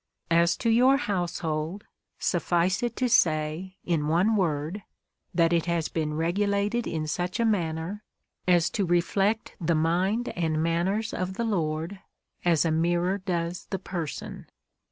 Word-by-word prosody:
As 170 +1 +4
to 230 - +1
your 255 +4 +5
household, 175 - -2 0.3
suffice 175 0 +1
it 240 -1 -2
to 255 - +1
say, 165 -3 +1
in 160 -4 0
one 180 +8 +3
word, 165 0 -1 0.5
that 170 -1 +3
it 170 0 +1
has 170 -2 0
been 155 -2 -2
regulated 200 +7 0
in 155 -2 -2
such 175 +7 -2
a 230 - +3
manner, 180 -1 -1 0.4
as 175 -2 +4
to 205 - 0
reflect 195 +5 +1
the 170 0 +2
mind 180 +9 +1
and 160 -2 -1
manners 190 +7 0
of 185 +1 -3
the 235 - -1
Lord, 165 -2 -1 0.4
as 170 -2 +3
a 165 - +2
mirror 175 +4 +1
does 175 -2 -3
the 190 - -1
person. 175 -5 -6
175 Hz, 145 wpm, -27 LUFS, 165-200 Hz, 0.5 s, your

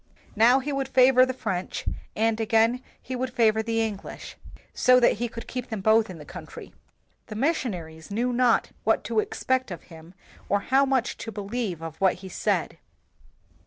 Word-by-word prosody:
Now 235 +4 +6
he 275 +2 -3
would 275 -1 -1
favor 255 -1 +5
the - - -1
French, 190 -7 -4 0.3
and 225 +1 +1
again 225 +3 +2 0.2
he 260 - -6
would 255 0 -3
favor 220 -3 +3
the 225 0 0
En 215 -3 -2
glish, - - -9 0.4
so 255 0 +5
that 235 -3 +3
he 240 - 0
could 230 0 -9
keep 250 -1 -5
them 220 -3 -4
both 220 +1 +4
in 180 - -8
the 150 - -11
country. - - -10 0.5
The 215 - -7
missionaries 195 - -2
knew 240 +5 -1
not 245 -1 +2
what - - +2
to - - 0
expect 260 - -1
of 175 - -7
him 165 +3 -14 0.3
or 200 0 +2
how 270 +5 +3
much 260 -3 0
to 225 - -6
be 210 - -6
lieve 200 -5 -3
of 160 -1 -7
what 190 -1 +4
he - - -7
said. - - -1
225 Hz, 190 wpm, -26 LUFS, 200-255 Hz, 0.5 s, Now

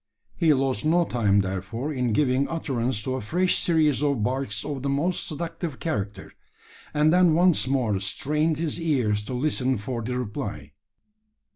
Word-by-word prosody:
He 165 -3 +3
lost 135 +1 -1
no 170 +3 +3
time, 100 -7 +2
therefore, 100 +9 -4
in 125 -3 0
giving 130 +2 +2
utterance 130 -8 -2
to 130 - -2
a - - -5
fresh 180 - +1
series 155 -5 +2
of 140 -7 +1
barks 125 -3 0
of 140 -3 -4
the 140 - -2
most 155 +6 0
seductive 165 -1 -5
character; 100 - -4 0.6
and 150 +2 +3
then 180 -3 +5
once 175 -5 +3
more 120 -7 +1
strained 150 - 0
his 165 +1 -2
ears 125 -10 +1
to 125 - -4
listen 130 -1 0
for 115 +3 -4
the 125 +3 -3
reply. 105 - -5
135 Hz, 160 wpm, -25 LUFS, 115-155 Hz, 0.6 s, then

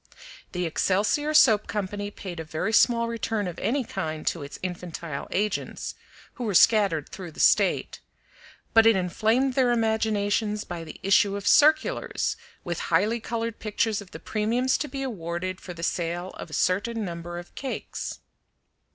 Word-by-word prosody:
The 180 -1 -1
Excelsior 210 - +1
Soap 220 -8 +6
Company 205 0 -3
paid 185 -4 -8
a - - -3
very 160 +7 -3
small 235 0 +4
return 225 -3 -2
of 175 - -6
any 270 +3 0
kind 160 -8 -4
to 170 - 0
its 140 0 -8
infantile 170 -4 -5
agents, 210 +1 -2 0.4
who 250 - -6
were 210 -5 -1
scattered 200 -8 +4
through 185 -3 -8
the - - -12
state, - - +3 0.7
but 225 0 +7
it 225 - +6
inflamed 220 +8 +1
their 250 -2 +3
imaginations 220 -2 +1
by 175 -1 -6
the 155 - -10
issue 200 +1 +4
of 200 0 -5
circulars 310 - +3 0.3
with 175 -2 -3
highly 210 +8 +2
colored 230 0 -3
pictures 215 0 0
of 200 - -12
the - - -9
premiums 235 +5 0
to 300 - -2
be 270 0 -5
awarded 185 -5 -4
for 180 - -8
the 165 - -8
sale 175 +1 -2
of - - -9
a - - -11
certain 210 +6 0
number 175 -1 -6
of 175 0 -9
cakes. 270 - -5
205 Hz, 160 wpm, -26 LUFS, 175-230 Hz, 0.7 s, but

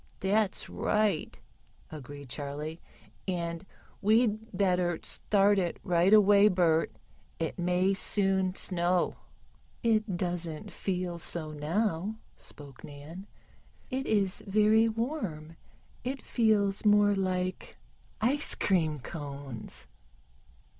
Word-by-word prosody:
"That's 200 +1 +1
right," 210 -6 0 0.5
agreed 145 -1 -9
Charley. 150 +4 -5 0.5
"And 170 -1 -3 0.4
we'd 220 +1 +2
better 180 -3 +1
start 200 0 +2
it 175 -2 -1
right 175 +1 +3
away, 205 -1 +7
Bert. 170 -5 +2 0.5
It 165 +2 -3
may 180 +2 +2
soon 190 -1 +2
snow." 180 -1 0 0.7
"It 215 -5 +1
doesn't 175 +1 -3
feel 180 -2 -3
so 160 -2 -2
now," 170 +6 -1 0.2
spoke 140 -3 -9
Nan. 155 +7 -10 0.6
"It 265 +1 -2
is 200 -3 0
very 215 +3 +4
warm. 215 - -4 0.5
It 265 +3 -4
feels 210 -4 +2
more 205 -1 +5
like 185 -1 -2 0.4
ice 265 +6 +3
cream 160 -6 +1
cones." 140 -5 -7
185 Hz, 100 wpm, -29 LUFS, 165-210 Hz, 0.7 s, away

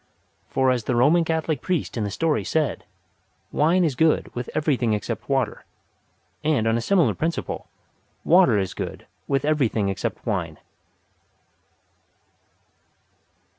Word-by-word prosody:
For 130 -1 +2
as 120 -4 -1
the 125 - 0
Roman 150 +8 +4
Catholic 160 -4 -1
priest 180 -5 -2
in 115 - -1
the 105 - -2
story 160 +8 0
said: 155 -3 -1 0.7
"Wine 170 +5 +3
is 155 -5 +1
good 155 +5 +1
with 125 0 -5
everything 135 -7 +1
except 105 -3 -4
water," - - 0 0.8
and 150 -8 +1
on 115 0 +2
a 115 - 0
similar 180 +5 +3
principle, 165 +1 -3 0.6
water 175 - +5
is 95 -2 -1
good - - -6 0.2
with 135 -1 0
everything 125 -9 +1
except 100 +4 -4
wine. 90 - -2
135 Hz, 130 wpm, -24 LUFS, 115-160 Hz, 0.8 s, water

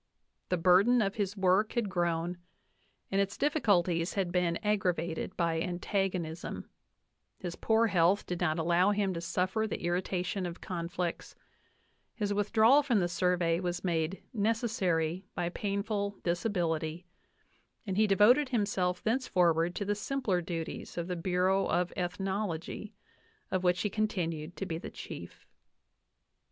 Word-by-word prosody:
The 180 - +1
burden 190 +8 +5
of 200 -3 +1
his 205 -1 -2
work 190 +3 +3
had 235 -4 0
grown, 175 -1 -1 0.7
and 195 0 +3
its 200 0 -2
difficulties 185 - +2
had 190 -3 0
been 175 -1 +1
aggra 200 -4 +2
V 160 - -3
vated 170 +2 -5
by 165 -2 +1
antagonism; 180 -2 -2 0.7
his 175 -3 -5
poor 225 +1 +2
health 190 -1 +3
did 180 0 -4
not 160 -2 +1
allow 170 +3 +3
him 205 -2 +1
to 170 - -4
suffer 185 +5 0
the - - -5
irritation 180 +1 -1
of 175 0 -7
conflicts; 175 -1 -4 0.8
his 205 -3 -1
withdrawal 220 +6 +5
from 250 -7 +2
the 175 - +1
Sur 180 +1 +1
vey 170 -1 +1
was 180 -1 -3
made 170 0 -1
"necessary 200 -7 0
by 175 -1 -1
painful 200 +1 -2
disability," 170 -3 -1 0.8
and 190 -3 -2
he 215 +2 +4
de 195 - +3
voted 250 +8 +5
himself 195 -6 0
thenceforward 175 -8 +2
to 205 - -2
the 205 - +1
simpler 210 -4 -1
duties' 165 -1 -5
of 170 0 -2
the 180 - -2
Bu 175 +2 -3
/ 180 - +2
reau 190 +1 +2
f 180 0 +1
Ethnology, 190 +1 -3 0.6
of 185 -1 0
which 180 0 +2
he 210 - +1
continued 175 -7 -2
to 195 - -4
be 165 -3 -3
the - - -7
chief. - - -9
185 Hz, 150 wpm, -31 LUFS, 175-205 Hz, 0.8 s, burden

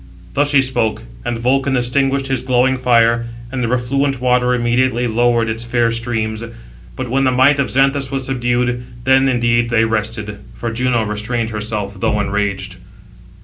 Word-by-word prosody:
Thus 145 +1 +1
she 140 -2 +4
spoke; 120 -4 -1 0.2
and 120 - -2
Vulcan 135 +3 +1
extinguished 135 +2 +1
his 135 -2 -1
glowing 130 +1 +2
fire, 115 -2 +2 0.2
and 130 -1 -3
the - - 0
refluent 130 +3 0
water 125 0 +2
immediately 120 +1 +1
lowered 120 0 +2
its 115 +1 -3
fair 120 -1 +1
streams. 110 -1 -3 0.5
But - - -4
when 135 +2 +1
the 130 - +3
might 130 +3 +4
of 140 - 0
Xanthus 135 0 +2
was 135 -1 -3
subdued, 120 -1 -1 0.2
then 130 +1 +4
indeed 120 -1 +1
they 115 -1 +3
rested; 110 -2 -3 0.2
for 115 - -4
Juno 120 -1 +1
restrained 110 +2 -2
herself, 105 -2 -4
though 105 - 0
enraged. 100 -1 -2
120 Hz, 160 wpm, -17 LUFS, 115-130 Hz, 0.5 s, she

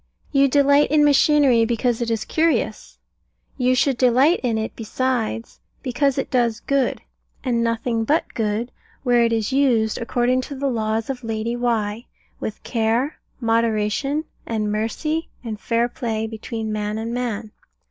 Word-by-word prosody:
You 275 -1 +4
delight 285 +1 +4
in 300 0 +4
machinery 285 -4 +5
because 235 +1 0
it 235 - -1
is 225 -2 -1
curious: 325 0 0 0.6
you 255 -1 +2
should 260 0 +1
delight 260 +7 +4
in 235 -3 0
it 220 0 -3
besides 230 0 -2 0.2
because 275 +1 +1
it 270 - -2
does 240 -4 +1
good, 275 -2 0 0.4
and 240 -3 +1
nothing 230 0 0
but 300 +8 +2
good, 220 +2 -1 0.3
where 245 -2 +4
it 230 - +2
is 225 +2 0
used, 240 -6 +2
according 245 +2 +1
to 280 +2 -7
the 275 +1 -1
laws 220 +1 -1
of 250 -2 -8
Lady 225 +1 -2
Why, 230 -2 -1 0.3
with 215 - -5
care, 230 +5 0 0.2
moderation, 230 +5 +1 0.2
and 215 -2 -1
mercy, 305 +10 -2
and 220 -3 -5
fair 235 +1 +1
play 225 -2 -3
between 220 0 -5
man 210 0 -2
and 225 +1 -4
man. 230 -3 -3
235 Hz, 150 wpm, -22 LUFS, 225-265 Hz, 0.6 s, machinery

